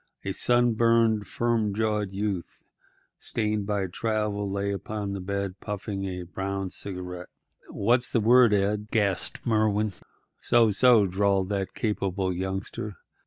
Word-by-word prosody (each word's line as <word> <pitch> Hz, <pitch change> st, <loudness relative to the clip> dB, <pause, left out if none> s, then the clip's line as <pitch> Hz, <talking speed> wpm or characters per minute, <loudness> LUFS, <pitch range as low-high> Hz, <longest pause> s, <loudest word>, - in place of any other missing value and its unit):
A 100 Hz, -, -1 dB
sunburned, 115 Hz, -1 st, +2 dB
firm 115 Hz, -4 st, 0 dB
jawed 105 Hz, -2 st, 0 dB
youth, 100 Hz, -3 st, -4 dB, 0.6 s
stained 105 Hz, -2 st, -2 dB
by 100 Hz, -2 st, 0 dB
travel, 105 Hz, +1 st, -2 dB
lay 100 Hz, +1 st, -1 dB
upon 100 Hz, +1 st, -4 dB
the 100 Hz, -, -4 dB
bed 100 Hz, 0 st, -3 dB
puffing 100 Hz, -1 st, -4 dB
at -, -, -3 dB
a 90 Hz, 0 st, -5 dB
brown 95 Hz, +1 st, -4 dB
cigarette. 90 Hz, -2 st, -5 dB, 0.4 s
"What's 120 Hz, +4 st, +2 dB
the 115 Hz, -, +2 dB
word, 120 Hz, +1 st, +6 dB
Ed?" 105 Hz, +1 st, +1 dB
gasped 100 Hz, -5 st, 0 dB
Merwin. 110 Hz, -2 st, +1 dB, 0.5 s
"So, 115 Hz, -2 st, +4 dB
so," 115 Hz, 0 st, +5 dB
drawled 95 Hz, 0 st, +1 dB
that 100 Hz, -2 st, -2 dB
capable 95 Hz, -3 st, -1 dB
youngster. 95 Hz, +3 st, -4 dB
100 Hz, 130 wpm, -26 LUFS, 95-110 Hz, 0.6 s, word